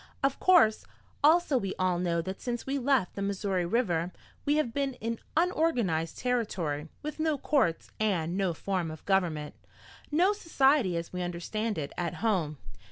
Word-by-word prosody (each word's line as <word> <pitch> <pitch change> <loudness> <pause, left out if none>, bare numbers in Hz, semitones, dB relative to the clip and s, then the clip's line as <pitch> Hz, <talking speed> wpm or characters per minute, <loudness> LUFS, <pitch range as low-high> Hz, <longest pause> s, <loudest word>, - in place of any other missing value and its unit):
Of 275 0 +1
course, 340 -13 +5 0.4
also 310 -3 +5
we 195 -4 -3
all 185 -1 +1
know 170 -2 0
that 190 +3 -6
since 240 -1 -3
we 275 +1 -1
left 260 -7 +2
the 200 - -5
Missouri 195 -2 -1
River 180 -5 0 0.3
we 290 - +3
have 300 -7 0
been 275 -1 -1
in 230 -1 -4 0.2
unorganized 250 - +1
territory, 185 -12 -1
with 305 +1 -5
no 310 -2 +1
courts 260 - +1
and 180 -6 0
no 190 -4 0
form 185 -2 -2
of 155 -1 -9
government, 170 -6 0 0.6
no 355 +7 +3
society 270 - +2
as 170 +1 -5
we 180 - -3
understand 190 +5 -3
it 145 -2 -4
at 170 -2 -2
home. 180 -10 0
200 Hz, 165 wpm, -29 LUFS, 175-275 Hz, 0.6 s, course